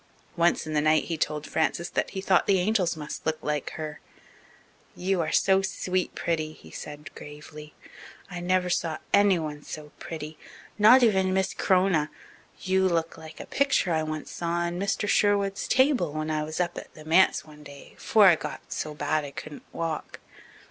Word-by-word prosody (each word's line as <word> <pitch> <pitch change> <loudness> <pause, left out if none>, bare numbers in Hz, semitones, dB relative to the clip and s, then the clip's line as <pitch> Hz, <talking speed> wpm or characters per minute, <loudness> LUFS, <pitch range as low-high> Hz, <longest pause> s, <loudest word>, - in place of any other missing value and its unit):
Once 170 0 +2
in 155 - -5
the 150 - +2
night 155 +1 +3
he 165 - -3
told 150 -1 -2
Frances 165 +2 0
that - - -1
he 190 - -5
thought 190 -1 +3
the 195 - +4
angels 185 -3 +1
must 150 -1 -6
look 160 0 0
like 150 -2 -2
her. 155 -2 -6 1.0
"You 185 0 0
are 160 - -2
so 190 0 +4
sweet 185 -1 -2
pretty," 155 -2 -2
he 80 - -16
said 150 - -9
gravely. 150 +1 -11 0.5
"I 180 -2 -6
never 180 +1 +1
saw 165 -2 -1 0.2
anyone 165 -7 +3
so 150 0 -9
pretty, 155 -1 -7 0.4
not 245 +5 +8
even 190 -4 +3
Miss 190 -1 0
C'rona. 180 -5 +2 0.5
You 190 0 +2
look 165 -1 -1
like 160 0 -12
a - - -7
picture 270 -10 +1
I 160 - +1
once 155 -1 -5
saw 170 - -4 0.2
on 175 +1 -3
Mr. 200 +1 -1
Sherwood's 200 -1 +2
table 260 - +3
when 155 0 -2
I 155 0 0
was 155 +2 -5
up 175 -1 -1
at - - -12
the 155 - -12
manse 170 +4 +4
one 150 -1 -15
day 145 -1 -13
'fore 215 -2 +5
I 175 -4 +7
got - - -7
so 155 -1 -4
bad 150 +1 0
I 145 - -6
couldn't 145 +1 -9
walk. 165 -2 -4
165 Hz, 185 wpm, -27 LUFS, 155-190 Hz, 1.0 s, not